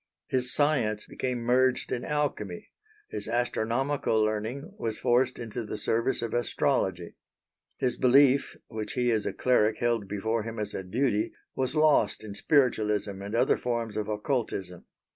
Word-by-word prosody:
His 125 -1 -1
science 125 -8 +1
became 125 -2 -3
merged 125 +2 +2
in 120 - -2
alchemy, 140 -11 -2 0.4
his - - -5
astronomical 120 +1 0
learning 110 - -2
was 110 -2 -2
forced 125 +1 +2
into 120 0 -5
the 105 - -5
service 115 +4 +1
of 115 - -3
Astrology. 95 -7 0 0.6
His 125 -2 0
belief, 135 +1 +4
which 110 -2 -5
he 125 -1 +1
as 110 -2 0
a - - 0
cleric 110 -4 +2
held 115 -4 0
before 110 +3 -1
him 115 +1 -6
as 105 -1 -3
a - - -3
duty, 110 +2 0 0.2
was 130 +3 -1
lost 150 -10 +3
in 105 -2 -7
spiritualism 105 -6 +1
and 100 +3 -4
other 125 +2 +3
forms 115 -3 -2
of 105 -1 -2
occultism. 105 -5 -3
115 Hz, 150 wpm, -28 LUFS, 105-130 Hz, 0.6 s, belief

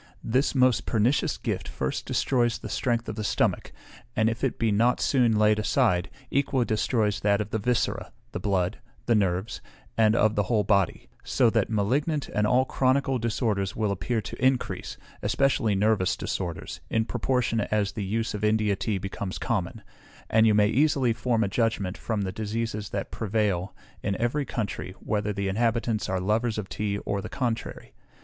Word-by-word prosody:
This 130 +6 +1
most 130 -2 +3
pernicious 115 +5 +1
gift - - -3
first 65 -1 -3
destroys 120 -3 +1
the - - -8
strength 120 -2 -1
of 110 - -4
the 110 - -2
stomach, - - 0 0.4
and 110 +1 +3
if 115 +3 -6
it 135 - 0
be 115 -2 +1
not 115 +4 +3
soon 120 -5 +3
laid 105 0 +4
aside, 105 -5 +2 0.2
equally 135 -2 +1
destroys 110 -2 +1
that 100 -1 +2
of 105 0 -3
the 110 - 0
viscera, 120 +3 -1 0.2
the - - -4
blood, 95 0 0 0.3
the 120 - +3
nerves, 100 0 0 0.4
and 110 0 +5
of 110 -2 +3
the 105 - +1
whole 110 -3 +3
body; 100 -2 +1 0.2
so 120 -4 +2
that 115 -3 +1
malignant 135 +8 0
and 105 0 +1
all 125 +3 +3
chronical 135 0 +1
disorders 110 -4 -1
will 105 -2 0
appear 100 +5 -1
to 120 - -7
increase, 130 -1 0 0.2
especially 130 -6 +1
nervous 100 -2 +2
disorders, 85 -4 -4
in 110 0 +1
proportion 120 -2 0
as 105 -2 +1
the 105 - -4
use 110 +4 -1
of 105 0 -5
India 105 -1 +2
tea 105 +1 -1
becomes 95 0 -5
common; 105 -2 -2 0.5
and 110 0 +5
you 105 - +4
may 105 0 +5
easily 135 -1 +2
form 115 -1 0
a - - +1
judgment, 105 -3 0
from 110 -3 -2
the 95 - -2
diseases 110 0 -3
that - - -4
prevail 100 -4 -1 0.3
in 100 - -2
every 130 +5 0
country, 100 -5 -4
whether 105 -1 -1
the 100 -1 -2
inhabitants 115 +2 0
are 95 0 0
lovers 110 +4 0
of 105 -2 -3
tea 105 -1 -2
or 100 -1 -1
the - - -7
contrary. 120 -4 -3
110 Hz, 175 wpm, -26 LUFS, 100-120 Hz, 0.5 s, and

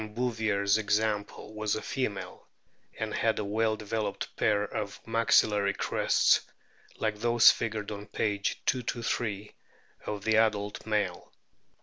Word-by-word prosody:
Bouvier's 110 -4 +1
example 105 0 -1
was 110 -1 -1
a 110 - -4
female, 100 -8 -4 0.5
and - - -3
had - - +1
a 105 - -2
well 110 +2 +1
developed 105 -1 -4
pair 105 -1 +2
of 105 -1 -5
maxillary 105 -3 +3
crests - - +3 0.6
like 110 -1 -2
those 120 0 +6
figured 110 -2 -3
on 105 0 -7
p. 105 -2 -1
223 115 -2 -2 0.5
of 105 -2 -4
the 110 0 +3
adult 105 -1 0
male. 105 -1 -1
105 Hz, 120 wpm, -29 LUFS, 105-110 Hz, 0.6 s, those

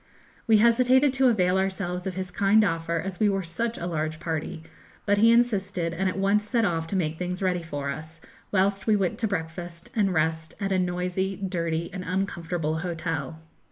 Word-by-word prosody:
We 220 -1 +6
hesitated 255 +4 +4
to 265 -1 +3
avail 190 -5 +3
ourselves 190 -1 -2
of 185 - -4
his 185 -1 -4
kind 200 +3 +4
offer, 165 -3 -1
as 180 +2 -4
we 210 - +4
were 195 -1 0
such 225 +8 -3
a 175 - -4
large 155 -2 -2
party; 160 0 -4 0.4
but 205 0 +3
he 225 +2 +6
insisted, 200 -8 +1
and 185 +3 0
at 185 - -4
once 200 +2 +2
set 235 -3 +2
off 165 -3 -1
to 195 - -3
make 160 -4 -1
things 180 0 -3
ready 180 -2 +1
for 145 -4 -4
us, 160 +3 -8 0.3
whilst 195 +1 +1
we 215 - +5
went 195 -3 0
to 225 - +1
breakfast 170 -2 -5
and 205 -4 +2
rest 160 -1 -1
at 195 -1 -2
a 190 - +2
noisy, 180 +2 -1
dirty, 170 -3 -2
and 185 -2 -5
uncomfortable 170 -4 -2
hotel. 165 -2 -4
180 Hz, 195 wpm, -26 LUFS, 165-200 Hz, 0.4 s, We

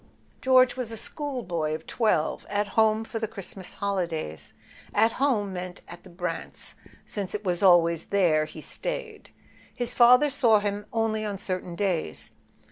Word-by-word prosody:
George 255 -1 +5
was 250 -3 -4
a 225 - -4
schoolboy 210 - -3
of 160 - -9
twelve, 215 -10 0
at 205 0 0
home 220 +1 +3
for 225 0 -5
the 220 - -2
Christmas 195 -3 -8
holidays. 175 - -3 0.4
At 225 +2 +4
home 215 -9 +1
meant 180 0 -6
at 175 - -10
the 190 - -14
Brants', 175 -1 -5 0.3
since 200 -2 -4
it 210 - -4
was 180 -3 -1
always 170 -3 +5
there 170 -6 +2
he 155 0 -10
stayed: - - -3 0.4
his 245 -1 -2
father 250 +4 +6
saw 235 -5 +4
him 205 0 -2
only 225 -1 0
on 205 -2 -3
certain 185 -2 -4
days. 175 - -1
205 Hz, 155 wpm, -26 LUFS, 175-225 Hz, 0.4 s, father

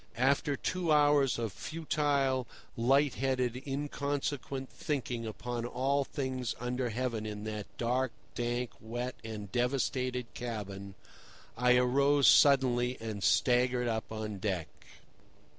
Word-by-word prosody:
After 140 +3 +2
two 175 +4 -1
hours 145 -3 +4
of 115 -5 -3
futile, 140 - 0 0.3
light 135 +4 +3
headed, 130 -2 -1
inconsequent 140 -1 -3
thinking 125 -5 -3
upon 120 +2 -4
all 135 +4 +1
things 130 -4 -3
under 125 +1 -1
heaven 115 -2 -2
in 105 -1 -5
that 105 -1 -4
dark, 125 +1 0 0.2
dank, 120 0 -2
wet 120 +3 -4
and 105 -3 -6
devastated 125 0 0
cabin, 100 -5 -6 0.6
I 125 0 +4
arose 140 +3 +4
suddenly 130 -3 +5
and 110 -2 -5
staggered 125 0 +3
up 110 -1 -2
on 110 -2 -4
deck. 95 -5 -2
125 Hz, 115 wpm, -32 LUFS, 115-135 Hz, 0.6 s, suddenly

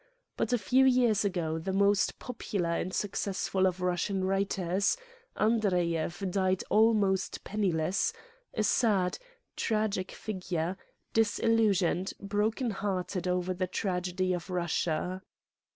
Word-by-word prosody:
But - - -1
a 245 - +4
few 250 +6 +3
years 245 -5 +4
ago 170 -5 -1
the 190 +4 -3
most 200 +1 +2
pop 250 -2 -8
ular 170 -4 -1
and 185 - -4
successful 190 -1 0
of 185 0 -2
Russian 180 +2 0
writers, 195 - +1 0.4
Andreyev 180 -5 +1
died 185 -1 +1
almost 210 -4 +3
penniless, 195 - 0 0.4
a 215 - -1
sad, 200 -5 +2 0.4
tragic 215 -4 -1
figure, 180 -4 -3 0.4
disil 225 +1 +2
lusioned, 195 -4 +1
broken 215 +4 -1
hearted 190 -2 -2
over 180 0 0
the 185 0 -2
tragedy 185 -1 -1
of 175 +1 -4
Russia. 180 0 -1
190 Hz, 120 wpm, -30 LUFS, 180-210 Hz, 0.4 s, a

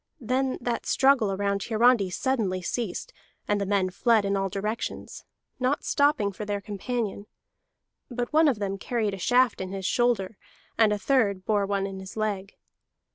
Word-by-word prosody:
Then 255 +2 0
that 240 -1 -2
struggle 265 -6 +3
around 200 0 -1
Hiarandi 225 -2 +3
suddenly 210 -4 -1
ceased, 220 0 -3 0.3
and 205 -1 +1
the 200 - -2
men 190 -2 +1
fled 220 +2 +2
in 200 0 0
all 195 0 0
directions, 210 +4 -4 0.3
not 255 +3 0
stopping 285 -8 +2
for 200 - -7
their 205 -1 -2
companion; 210 0 -4 0.8
but 245 +2 -4
one 315 +1 +5
of 265 -6 +2
them 195 -1 -3
carried 220 -3 -1
a 195 - -6
shaft 245 +3 +3
in 185 - -4
his 195 -1 -5
shoulder, 225 -5 +1 0.4
and 220 -2 +4
a 210 - +1
third 205 -5 +1
bore 205 -2 +1
one 200 -1 0
in 195 -1 -6
his 190 +3 -10
leg. 205 -2 -2
210 Hz, 170 wpm, -26 LUFS, 195-245 Hz, 0.8 s, one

